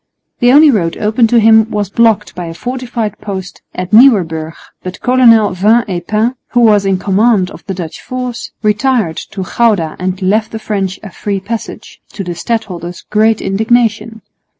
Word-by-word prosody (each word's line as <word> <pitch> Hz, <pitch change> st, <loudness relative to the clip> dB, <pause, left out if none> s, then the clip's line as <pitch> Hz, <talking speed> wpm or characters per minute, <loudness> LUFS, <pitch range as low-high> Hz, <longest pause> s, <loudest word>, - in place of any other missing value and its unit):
The 245 Hz, 0 st, +4 dB
only 295 Hz, +2 st, +6 dB
road 170 Hz, -8 st, -1 dB
open 220 Hz, +2 st, +1 dB
to 235 Hz, +1 st, +3 dB
him 220 Hz, 0 st, +4 dB
was 205 Hz, -3 st, -3 dB
blocked 230 Hz, -2 st, +1 dB
by 175 Hz, 0 st, -6 dB
a 165 Hz, -, -7 dB
fortified 245 Hz, -2 st, -4 dB
post 190 Hz, -3 st, -7 dB
at 185 Hz, 0 st, -5 dB
Nieuwerbrug, 175 Hz, -10 st, +3 dB, 0.3 s
but 185 Hz, 0 st, -7 dB
Colonel 235 Hz, -4 st, +4 dB
Vin 215 Hz, +6 st, +2 dB
et 175 Hz, -3 st, -5 dB
Pain, 220 Hz, +3 st, 0 dB, 0.2 s
who 240 Hz, -, +3 dB
was 210 Hz, -3 st, +4 dB
in 190 Hz, -1 st, +1 dB
command 200 Hz, 0 st, +1 dB
of -, -, -12 dB
the 190 Hz, -, -4 dB
Dutch 170 Hz, -3 st, -7 dB
force, 250 Hz, -1 st, -5 dB
retired 215 Hz, -5 st, 0 dB
to 195 Hz, -, -6 dB
Gouda 200 Hz, -6 st, 0 dB
and 185 Hz, +1 st, -3 dB
left 210 Hz, +3 st, 0 dB
the -, -, -3 dB
French 200 Hz, -3 st, -3 dB
a 205 Hz, -, -9 dB
free 200 Hz, +2 st, -3 dB
passage, 220 Hz, +4 st, -7 dB
to 195 Hz, -, -5 dB
the 175 Hz, -1 st, -5 dB
stadholder's 180 Hz, -3 st, -4 dB
great 220 Hz, +1 st, +2 dB
indignation. 220 Hz, +1 st, 0 dB
210 Hz, 175 wpm, -13 LUFS, 185-230 Hz, 0.3 s, only